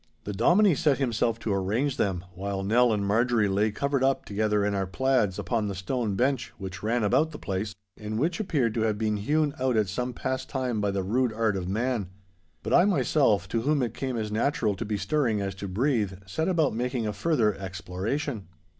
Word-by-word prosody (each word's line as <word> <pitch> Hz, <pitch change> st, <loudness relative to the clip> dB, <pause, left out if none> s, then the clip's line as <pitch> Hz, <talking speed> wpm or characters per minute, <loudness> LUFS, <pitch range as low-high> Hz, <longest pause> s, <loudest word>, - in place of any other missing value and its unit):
The 105 Hz, -, -4 dB
Dominie 175 Hz, -, +4 dB
set 150 Hz, -3 st, +2 dB
himself 115 Hz, -3 st, 0 dB
to 110 Hz, -, -1 dB
arrange 110 Hz, +9 st, 0 dB
them, 95 Hz, -2 st, -1 dB
while 95 Hz, +1 st, -3 dB
Nell 120 Hz, +4 st, +4 dB
and 105 Hz, -2 st, 0 dB
Marjorie 115 Hz, +1 st, +2 dB
lay 100 Hz, +3 st, +2 dB
covered 140 Hz, +5 st, -1 dB
up 135 Hz, 0 st, +1 dB
together 105 Hz, 0 st, 0 dB
in 105 Hz, -, 0 dB
our 95 Hz, -1 st, -1 dB
plaids 125 Hz, -3 st, +1 dB
upon 115 Hz, -4 st, -1 dB
the 100 Hz, -, -4 dB
stone 105 Hz, +2 st, -2 dB
bench 130 Hz, +2 st, 0 dB
which 95 Hz, -2 st, -7 dB
ran 115 Hz, +2 st, 0 dB
about 130 Hz, +10 st, +3 dB
the 155 Hz, -, -8 dB
place, 100 Hz, -1 st, -3 dB, 0.2 s
and 105 Hz, 0 st, -4 dB
which 160 Hz, -, 0 dB
appeared 145 Hz, -, 0 dB
to 115 Hz, -, -1 dB
have 110 Hz, -2 st, +1 dB
been 105 Hz, -1 st, 0 dB
hewn 145 Hz, +7 st, +1 dB
out 130 Hz, -2 st, +1 dB
at 105 Hz, -2 st, +2 dB
some 125 Hz, +6 st, -2 dB
past 130 Hz, +2 st, -3 dB
time 125 Hz, -5 st, -1 dB
by 105 Hz, -, +1 dB
the 100 Hz, -1 st, -1 dB
rude 120 Hz, +5 st, +1 dB
art 110 Hz, -2 st, 0 dB
of 90 Hz, -1 st, -3 dB
man. 110 Hz, -1 st, -1 dB, 0.5 s
But -, -, -2 dB
I 175 Hz, -, +6 dB
myself, 135 Hz, -, +2 dB
to 115 Hz, -, 0 dB
whom 145 Hz, +2 st, +1 dB
it 115 Hz, -2 st, -2 dB
came 130 Hz, -1 st, -3 dB
as 105 Hz, -1 st, -3 dB
natural 110 Hz, -2 st, +1 dB
to -, -, -4 dB
be 105 Hz, 0 st, -2 dB
stirring 115 Hz, -, 0 dB
as 100 Hz, -1 st, -2 dB
to 100 Hz, +1 st, -6 dB
breathe, 110 Hz, 0 st, 0 dB
set 160 Hz, -, -2 dB
about 165 Hz, -, +2 dB
making 125 Hz, 0 st, -2 dB
a 105 Hz, -, -2 dB
further 115 Hz, -2 st, +1 dB
exploration. 95 Hz, -, -4 dB
110 Hz, 210 wpm, -27 LUFS, 100-130 Hz, 0.5 s, I